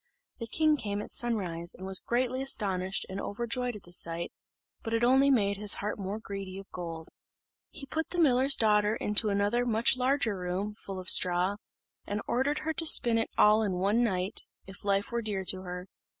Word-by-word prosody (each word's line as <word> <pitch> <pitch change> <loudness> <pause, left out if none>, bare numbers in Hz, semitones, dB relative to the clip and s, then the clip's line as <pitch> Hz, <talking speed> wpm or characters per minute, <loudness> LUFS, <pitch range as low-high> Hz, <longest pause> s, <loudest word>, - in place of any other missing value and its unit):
The 230 - -5
king 310 +4 +2
came 205 -5 -3
at 210 - -7
sunrise, 180 -8 -1
and 185 - -9
was 190 -1 +4
greatly 255 +2 -1
astonished 195 -8 0
and 195 +1 -5
overjoyed 240 +3 -2
at 205 - -10
the 175 - -12
sight; 170 -1 -2 0.5
but 225 0 -2
it 230 - 0
only 265 +3 +5
made 200 -7 +2
his 205 0 +3
heart 210 +1 -4
the - - -8
more 195 +3 -3
greedy 195 -3 -7
of 195 0 -11
gold. 165 -2 -6 0.6
He 290 - -9
put 320 +3 -3
the 355 - -5
miller's 270 -4 +4
daughter 210 -1 +2
into 210 0 +1
another 205 +4 +1
much 230 0 +2
larger 255 -4 +1
room, 185 +3 -3
full 195 -2 -9
of 185 - -9
straw, 180 +3 +4 0.5
and 205 +1 -2
ordered 270 +5 0
her 320 - 0
to 325 - -1
spin 235 -6 +5
it 225 - -1
all 210 +1 +5
in 205 -3 -1
one 200 +6 +1
night, 190 -2 -2 0.2
if 195 +1 -12
life 200 +1 0
were 235 0 -1
dear 200 -4 -3
to 185 0 -1
her. 180 0 -7
210 Hz, 200 wpm, -29 LUFS, 190-240 Hz, 0.6 s, only